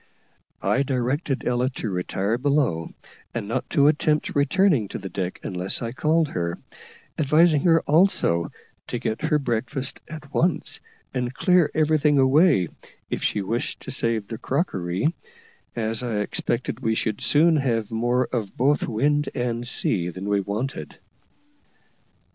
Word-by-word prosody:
I 105 +8 +2
directed 135 +2 -1
Ella 125 +1 +1
to 110 - -3
retire 95 +5 -1
below, 140 - +1 0.5
and 110 -4 -3
not 115 - -3
to 140 -4 +3
attempt 150 0 +1
returning 145 - +3
to - - -6
the 95 -1 -7
deck 90 -1 -4
unless 90 0 -1
I 115 - -3
called 155 +4 +1
her, 85 -1 -2 0.6
advising 155 +1 +4
her 165 -2 +5
also 150 - +2 0.4
to - - -3
get 110 +8 -3
her 155 -1 +3
breakfast 130 +1 -2
at 150 -2 -10
once, 175 +1 0 0.3
and 125 -2 -1
clear 180 -4 +3
everything 155 -1 +3
away, 135 - +4 0.4
if - - -2
she 105 - 0
wished 115 +5 -3
to 130 - -5
save 115 -5 0
the 115 +1 -6
crockery, 125 - -1 0.6
as 115 -1 -1
I 120 -4 -2
expected 115 +3 -2
we 110 -3 0
should 110 -2 -2
soon 160 +2 +4
have 115 -6 -1
more 120 +3 +1
of 110 -6 -4
both 140 +4 +2
wind 145 +6 +1
and 120 -1 -2
sea 90 -7 0
than 95 +3 -6
we 100 -1 +2
wanted. 105 +8 -4
125 Hz, 145 wpm, -24 LUFS, 110-150 Hz, 0.6 s, her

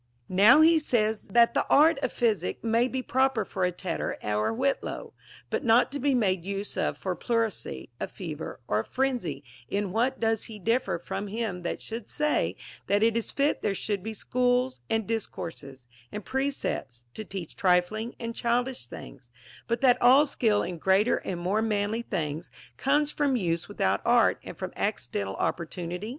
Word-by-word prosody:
Now 210 +11 +6
he 325 0 +6
that - - -9
says 220 -2 +1
that 235 +4 +4
the - - +2
art 300 0 +5
of 260 - -1
physic 210 -7 0
may 230 +2 +2
be 260 0 -3
proper 260 -5 +1
for 185 -1 -1
a 180 - +1
tetter 175 -1 -3
or 105 0 0
a - - 0
whitlow, 270 +3 -2 0.4
but - - -1
not 235 +1 +4
to 285 - -3
be 275 0 +2
made 190 -7 +1
use 200 +2 -4
of - - -1
for 190 - -3
a - - -2
pleurisy, 225 - -2
a - - -2
fever, 160 -4 -7
or 105 - +1
a - - -1
frenzy, 240 - -2 0.3
in 200 -1 -1
what 245 +6 0
does 225 -1 0
he 220 -2 -9
differ 230 +1 0
from 195 +4 -5
him 205 -3 -3
that 175 - -4
should 225 -1 -6
say 300 0 0 0.3
that 205 +1 +3
it 230 0 +3
is 230 - -1
fit 280 +1 +1
there 205 - 0
sliould 200 0 -2
be 220 +3 -5
schools, 250 +3 +1
and 225 -1 0
discourses, 160 - -5 0.3
and 210 -1 -6
precepts, 265 - -3
to 215 - -5
teach 190 -5 -7
trifling 190 +5 +1
and 230 -1 -4
childish 240 - -1
things, 125 0 -11 0.4
but 235 0 -1
that 250 -2 +4
all 265 +5 +7
skill 225 -7 +1
in 175 -2 -5
greater 195 +6 +3
and 180 -2 -4
more 190 +5 0
manly 215 +1 0
things 155 -6 -3 0.3
comes 295 +2 +1
from 285 -3 +1
use 170 -7 -1
without - - 0
art - - +4
and - - -9
from - - -5
accidental 95 -1 -2
opportu 170 0 -3
nity 180 +5 -5
220 Hz, 185 wpm, -27 LUFS, 180-245 Hz, 0.4 s, all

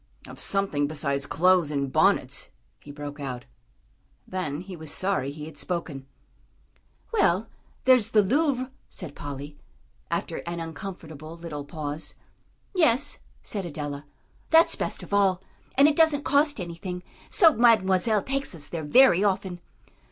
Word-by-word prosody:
"Of - - -11
something 195 -8 0
besides 140 -2 -2
clothes 180 -1 +3
and 140 -2 -2
bonnets," - - +2 0.3
he - - -15
broke 145 0 -7
out. 130 -3 -5 0.8
Then 165 -5 -3
he 185 0 -8
was 160 -3 -6
sorry 190 -8 0
he 150 +1 -8
had 155 -2 -9
spoken. 160 -7 -4 1.1
"Well, 220 - +2 0.3
there's 255 -4 +5
the 215 -2 +4
Louvre," 260 +2 +1 0.2
said 170 -6 -5
Polly, 145 +1 -7 0.5
after - - -2
an 170 0 -3
uncomfortable 165 -1 -8
little 155 -4 -6
pause. 150 0 -4 0.6
"Yes," 290 -6 +2 0.2
said 200 -3 -3
Adela, 145 -3 -5 0.4
"that's 325 +1 +6
best - - -3
of - - -9
all, 195 -2 +3 0.4
and 275 +2 +7
it 300 - +1
doesn't 315 -3 +4
cost 290 -2 +3
anything; 180 +1 -5 0.3
so 330 -7 +6
Mademoiselle 215 -3 +4
takes 275 -7 -2
us 150 -3 -8
there 165 -2 -4
very 195 - +6
often." 190 -3 0
180 Hz, 135 wpm, -26 LUFS, 150-225 Hz, 1.1 s, and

